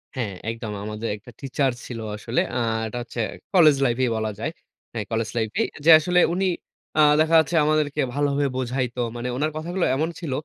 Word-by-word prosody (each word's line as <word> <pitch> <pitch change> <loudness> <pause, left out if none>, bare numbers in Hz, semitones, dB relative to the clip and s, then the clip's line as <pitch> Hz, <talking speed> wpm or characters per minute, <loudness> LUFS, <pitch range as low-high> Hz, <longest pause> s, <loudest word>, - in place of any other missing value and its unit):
হ্যাঁ, 115 -6 -2 0.2
একদম। 115 -1 -6
আমাদের 110 +2 -4
একটা 115 +4 -14
টিচার 135 0 0
ছিল 120 -2 -6 0.2
আসলে। 115 +3 0
আ - - 0 0.3
এটা 110 - -6
হচ্ছে 120 0 -8 0.3
কলেজ 160 -6 +7
লাইফই 125 +1 +1
বলা 110 -1 -1
যায়। 115 - -2 0.4
হ্যাঁ, 110 -3 -3
কলেজ 115 -1 -1
লাইফেই। 110 -1 0 0.2
যে - - +5
আসলে 180 +3 +2 0.2
উনি 190 +1 0 0.5
আ - - +6 0.2
দেখা 160 +1 +3
যাচ্ছে 160 +2 0
আমাদেরকে 150 -1 +1
ভালোভাবে 145 0 +1
বোঝাইতো। 125 -1 -2 0.2
মানে 120 +1 -4
উনার 150 +4 0
কথাগুলো 175 +3 -1
এমন 155 +4 0
ছিল, 165 -6 -5
130 Hz, 180 wpm, -24 LUFS, 115-155 Hz, 0.5 s, কলেজ